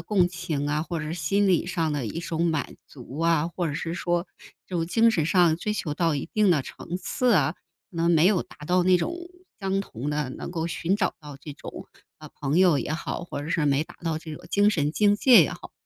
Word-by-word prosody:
共 190 -4 +2
情 170 -5 -3
啊， 150 +1 0
或 170 0 -4
者 155 +1 -4
心 190 +5 +1
理 175 -2 +2
上 165 -3 -1
的 140 -6 -2
一 165 +10 -4
种 170 0 -1
满 160 -5 -2
足 130 +1 -11
啊， 165 -1 +2
或 175 - -1
者 145 - -3
是 165 +1 -3
说 175 0 -1 0.4
这 185 - -8
种 165 - -1
精 230 +6 +4
神 160 -8 0
上 170 -2 +4
追 210 +4 -2
求 155 -7 -3
到 165 0 +1
一 140 - -3
定 210 -3 +3
的 150 -6 +3
层 175 - -7
次 250 +6 0
啊， 155 -3 +3 0.4
可 175 - -13
能 170 +1 +3
没 165 -1 +4
有 195 -3 +3
达 - - -17
到 180 +3 +2
那 185 0 +5
种 180 - -2 0.5
相 195 0 0
同 130 - -6
的， 150 -3 -1
能 - - -7
够 165 -2 -2
寻 170 +3 -1
找 190 -3 0
到 145 -2 -10
这 150 +2 -8
种， - - -9 0.3
呃， - - -12
朋 145 +3 0
友 180 -6 +5
也 - - -4
好， 165 +2 -3
或 145 -4 -6
者 155 - -6
是 160 -3 +1
没 145 +2 +2
达 - - -15
到 165 -2 -1
这 160 0 -7
种 - - -12
精 205 +1 +4
神 150 -6 0
境 205 +4 +3
界 235 -5 +7
也 135 - -1
好。 - - -10
165 Hz, 260 characters per minute, -25 LUFS, 150-180 Hz, 0.5 s, 界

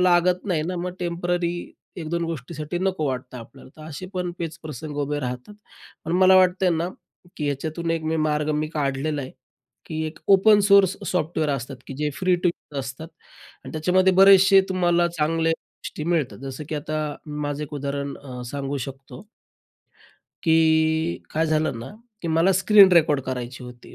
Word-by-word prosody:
लागत 180 0 +3
नाही 165 -5 0
ना. 180 +2 -3
मग 180 +1 -3
टेम्पररी 175 0 -1 0.4
एक 160 -3 -5
दोन 170 0 -1
गोष्टीसाठी 155 +1 -5
नको 185 -5 -1
वाटतं 130 -1 -4
आपल्याला. 130 +6 -13
असे 160 +4 -7
पण 180 -1 -2
पेच 165 -1 -4
प्रसंग 150 0 -7
उभे 145 +1 -1
राहतात. 125 +9 -5 0.5
पण 165 - -3
मला 185 0 +6
वाटतंय 185 0 +4
ना, 165 +1 0 0.5
की 150 - -3
याच्यातून 160 +4 -3
एक 165 -1 -1
मी 160 +1 0
मार्ग 150 -1 0
मी 155 +1 -1
काढलेला 145 +1 -1
आहे, 130 - -7 0.6
की 160 -1 -4
एक 155 - -8
ओपन 205 +2 +6
सोर्स 195 -2 +6 0.2
सॉफ्टवेअर 160 -3 0
असतात, 135 -1 -4
की 135 - -7
जे 150 0 -1
फ्री 185 -1 +2
टू 175 0 +1
यूज 150 -4 -6
असतात 135 +5 -7 0.6
आणि - - -9
त्याच्यामध्ये 185 +4 +3
बरेचसे 195 0 +7
तुम्हाला 175 -2 +2
चांगल्या 165 0 0
गोष्टी 155 -1 -8
मिळतात. 165 -6 -1
जसं 135 +2 -6
की - - -2
आता 155 +1 -3 0.3
मी 150 0 -5
माझं 145 0 -3
एक 150 - -10
उदाहरण 140 0 -4
अ, 125 -3 -8
सांगू 140 0 -3
शकतो. 135 +9 -11 1.2
की 160 0 +2
काय 160 +1 0
झालं 155 -5 0
ना, 115 - -7 0.3
की 170 - -3
मला 165 +4 +3
स्क्रीन 200 +1 +7
रेकॉर्ड 155 -4 +4
करायची 125 -1 -5
होती. 125 -1 -12
160 Hz, 170 wpm, -23 LUFS, 145-175 Hz, 1.2 s, बरेचसे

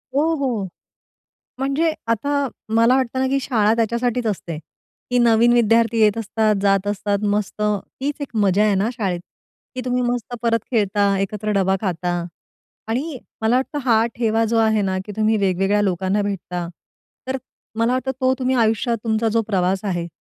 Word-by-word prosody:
हो, 320 +3 +2
हो. 240 -9 -1 0.9
म्हणजे 275 +5 +1 0.2
आता 230 +5 0 0.5
मला 230 +3 +5
वाटतं 260 -1 0
ना 265 - +2
की 275 +1 +1
शाळा 220 -5 +2
त्याच्यासाठीच 235 +1 0
असते. 170 -6 -3 0.5
की 250 - +3
नवीन 235 0 +5
विद्यार्थी 230 0 +3
येत 210 +1 +4
असतात, 220 -1 +1
जात 195 0 +2
असतात. 205 0 -1
मस्त, 210 0 -2 0.4
हीच 290 +1 -2
एक 255 -5 -6
मजा 200 +2 +3
आहे 210 -2 +3
ना 200 +4 +1
शाळेत. 190 -6 -2 0.6
की 255 - -3
तुम्ही 250 0 0
मस्त 245 0 -2
परत 230 -1 +2
खेळता, 200 -3 +2
एकत्र 210 +2 -2
डबा 190 0 +2
खाता 180 -2 -1 0.8
आणि 270 +4 -2 0.2
मला 220 +3 +3
वाटतं 270 +3 -1
हा 225 -2 +4
ठेवा 225 -1 +1
जो 230 +1 0
आहे 220 -1 +3
ना 190 -1 -1
की 210 - -7
तुम्ही 215 0 +2
वेगवेगळ्या 195 +1 +1
लोकांना 190 +1 0
भेटता, 180 -3 -3 0.6
तर 265 0 -1 0.4
मला 235 +2 +2
वाटतं 260 +1 -1
तो 260 0 +3
तुम्ही 255 0 +1
आयुष्यात 225 0 +1
तुमचा 225 0 +1
जो 230 - +3
प्रवास 190 -1 0
आहे, 175 -3 -2
220 Hz, 165 wpm, -21 LUFS, 200-245 Hz, 0.9 s, मला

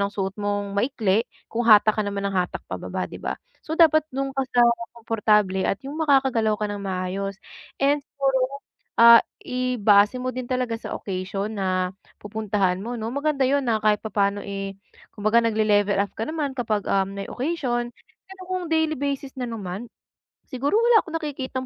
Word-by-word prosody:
ng 200 +1 0
suot 195 0 -3
mong 205 0 -2
maikli 225 -2 +1 0.2
kung 235 +1 -2
hatak 215 0 +6
ka - - +2
naman 200 0 -3
ng 195 - -5
hatak 180 -1 -1
pababa, - - -4
'di - - -9
ba? - - -1 0.3
So 315 - -5
dapat 310 -2 +6
dun 270 0 -2
ka 270 - +1
sa 245 - +2 0.4
komportable 210 -4 +1
at 195 - -1
yung 285 +3 -6
makakagalaw 260 -7 +3
ka 210 - 0
nang 205 -1 -5
maayos. 190 +1 -3 0.4
And 285 +1 +3
siguro, 270 0 -1 0.4
ah, 235 0 +10 0.3
ibase 245 -4 +3
mo 255 - -1
din 255 0 -5
talaga 250 -3 -1
sa - - -5
occasion 195 +2 -4
na 185 -1 0 0.3
pupuntahan 205 -3 -1
mo 235 +4 -5
'no. 225 -1 -4
Maganda 285 -1 0
yun 280 0 +1
na 225 -2 +2
kahit 210 -1 +3
papaano 200 -1 0
eh, 195 -1 -5 0.4
kumbaga 215 +3 +3
nagle-level 210 -2 +2
up 200 - -1
ka - - -3
naman 305 -3 -2
kapag, 215 -4 -1
um, 195 0 +1
may 195 - -4
occasion. 250 -4 -2 0.4
Pero 385 - -12
kung 370 -2 -2
daily 320 -1 +2
basis 280 -1 -3
na 250 - -2
naman, 210 +1 -6 0.6
siguro 275 +6 -1
wala 465 -1 +5
akong 330 -1 -4
nakikitang 265 -4 -4
225 Hz, 175 wpm, -24 LUFS, 200-270 Hz, 0.6 s, ah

